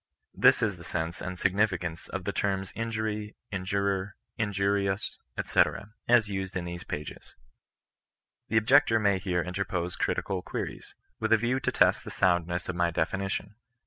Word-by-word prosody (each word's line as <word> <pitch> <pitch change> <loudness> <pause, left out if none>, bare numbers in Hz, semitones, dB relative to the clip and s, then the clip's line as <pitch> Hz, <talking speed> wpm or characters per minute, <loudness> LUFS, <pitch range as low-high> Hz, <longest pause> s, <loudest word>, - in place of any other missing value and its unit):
This - - +5
is 100 -5 0
the 85 - -11
sense 85 0 -3
and 90 0 -4
signification 90 -3 +1 0.2
of 95 -2 -3
the 100 - -1
terms 95 -1 -1
injury, 110 -2 -3 0.2
injurer, 100 +1 -1 0.2
injurious, 100 -1 0 0.3
&c., - - +4 0.5
as 120 -3 +5
used 95 -2 -3
in 90 - -3
these 85 0 -6
pages. 75 0 -7 1.1
The 110 - +1
ob 110 - +3
jector 120 -3 +5
may 100 -3 +3
here 90 -2 0
interpose 90 -1 -2
critical 95 -2 -1
queries, - - -6 0.2
with - - -1
a 115 - +7
view 120 +4 0
to - - 0
test - - +4
the - - -7
soundness 85 -1 +1
of 90 - -3
my 85 -1 +2
definition. 95 +5 -2
95 Hz, 155 wpm, -29 LUFS, 90-105 Hz, 1.1 s, a